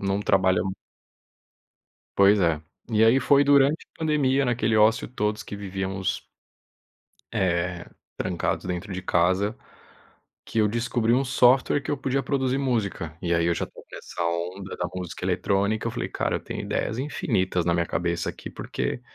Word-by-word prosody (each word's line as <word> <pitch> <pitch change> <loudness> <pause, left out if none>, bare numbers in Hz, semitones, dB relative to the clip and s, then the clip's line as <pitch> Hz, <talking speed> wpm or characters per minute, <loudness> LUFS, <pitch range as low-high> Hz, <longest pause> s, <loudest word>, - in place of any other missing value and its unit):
não 100 0 0
trabalha 95 -2 +3 1.6
Pois 100 +1 +6
é, 80 -4 +1 0.3
e 110 0 +4
aí 120 +4 +5
foi 140 +2 +4
durante 140 +1 +5
a - - -31
pandemia 145 -4 +2
naquele 115 -2 +1
ócio 110 +1 +4
todos 105 -3 -2
que - - -8
vivíamos 95 -1 -3 1.2
eh, 85 -1 0 0.3
trancados - - -2
dentro 90 +2 -4
de 95 0 -4
casa, 95 +5 +2 0.9
que 115 - -1
eu 105 - +4
descobri 115 +1 0
um 130 +2 +3
software 130 +2 +4
que - - -7
eu 145 - 0
podia 135 0 0
produzir 130 -2 0
música, 105 - -2
e 85 -1 0
aí 85 0 +2
eu 85 - +3
já - - -2
estava - - -15
nessa 85 - -6
onda 90 +3 -3
da 90 - -1
música 90 -3 -5
eletrônica, 100 +3 0
eu - - -2
falei: 120 +1 -4
"Cara, - - -1
eu - - -9
tenho - - -6
ideias 110 - -2
infinitas 95 - -1
na 85 - +2
minha 85 0 +1
cabeça 85 +1 -1
aqui", - - -8
porque - - -4
105 Hz, 165 wpm, -25 LUFS, 90-125 Hz, 1.6 s, Pois